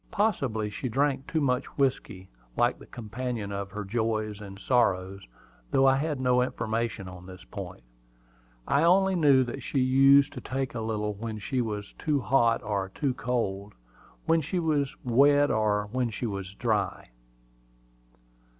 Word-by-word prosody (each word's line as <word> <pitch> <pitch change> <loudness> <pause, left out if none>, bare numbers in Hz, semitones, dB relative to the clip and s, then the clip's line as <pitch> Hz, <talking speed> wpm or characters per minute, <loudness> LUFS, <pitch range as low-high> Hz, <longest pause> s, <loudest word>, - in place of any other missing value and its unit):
Possibly 140 - 0
she 125 +5 -4
drank 135 +2 0
too 160 - -1
much 125 -1 0
whiskey, 130 -9 -1 0.3
like - - +2
the - - -14
companion 120 -2 -5
of 100 0 -4
her 105 +1 -6
joys 110 -1 -2
and 100 -1 -9
sorrows, 95 - 0 0.4
though 135 - +3
I 135 0 +5
had 150 -1 -2
no 125 -1 +3
information 115 -4 -2
on 90 0 -10
this 90 -1 -11
point. - - -8 0.8
I 140 - +3
only 190 +3 +4
knew 145 -7 +5
that 130 +2 -6
she 135 - -4
used 135 +2 +5
to - - -7
take 135 0 -3
a 115 - -4
little 105 -1 -2
when 110 +1 -6
she 125 +5 -2
was 105 -3 -4
too 150 -3 +1
hot 120 -2 +2
or 100 -3 -2
too 140 -4 0
cold, 105 -6 -3 0.5
when 165 0 +3
she 155 +6 -3
was 150 -5 0
wet 145 +4 +4
or 105 -1 +1
when 125 -1 0
she 115 +2 -5
was 100 -3 -5
dry. 110 -4 -1
120 Hz, 160 wpm, -27 LUFS, 105-135 Hz, 0.8 s, I